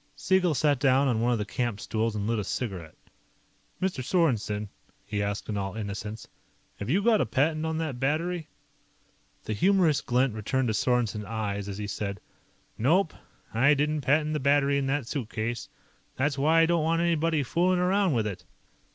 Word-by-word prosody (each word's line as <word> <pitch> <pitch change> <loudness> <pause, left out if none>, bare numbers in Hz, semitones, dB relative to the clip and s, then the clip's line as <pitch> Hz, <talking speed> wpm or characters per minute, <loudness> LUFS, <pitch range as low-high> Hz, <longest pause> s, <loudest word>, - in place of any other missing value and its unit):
Siegel 185 -4 +2
sat 145 0 +2
down 135 +1 +3
on 115 -4 +1
one 120 +1 +2
of 120 - +2
the 105 - -2
camp 120 0 -2
stools 110 +1 -1
and 100 -1 -2
lit 115 0 0
a - - -2
cigarette. 95 -7 -4 0.8
"Mr. 185 -8 -1
Sorensen," 115 - 0 0.4
he 105 0 -2
asked 100 0 -3
in 105 - -2
all 95 0 -3
innocence, 105 0 -5 0.5
"have 100 - -5
you 190 +8 +2
got 225 -2 +4
a - - +2
patent 155 +7 +1
on 160 0 -2
that 155 -6 -3
battery?" 160 +4 -1 1.0
The 110 - -3
humorous 170 - +3
glint 125 0 +1
returned 120 +4 -1
to - - 0
Sorensen's 110 -2 0
eyes 100 -2 -3
as 100 - -5
he 105 - -4
said, 100 -1 -4 0.6
"Nope. 160 - +3 0.4
I 135 +6 +4
didn't 150 +1 0
patent 150 +3 +2
the 150 - 0
battery 140 0 +3
in 135 - -1
that 135 -1 0
suitcase. 115 -4 -4 0.5
That's 140 +2 0
why 155 +4 +4
I - - +6
don't 170 0 +2
want 165 +1 +1
anybody 165 -2 +1
fooling 180 +7 +1
around 185 0 +2
with 110 -2 +1
it." 100 -4 -5
130 Hz, 180 wpm, -27 LUFS, 110-160 Hz, 1.0 s, I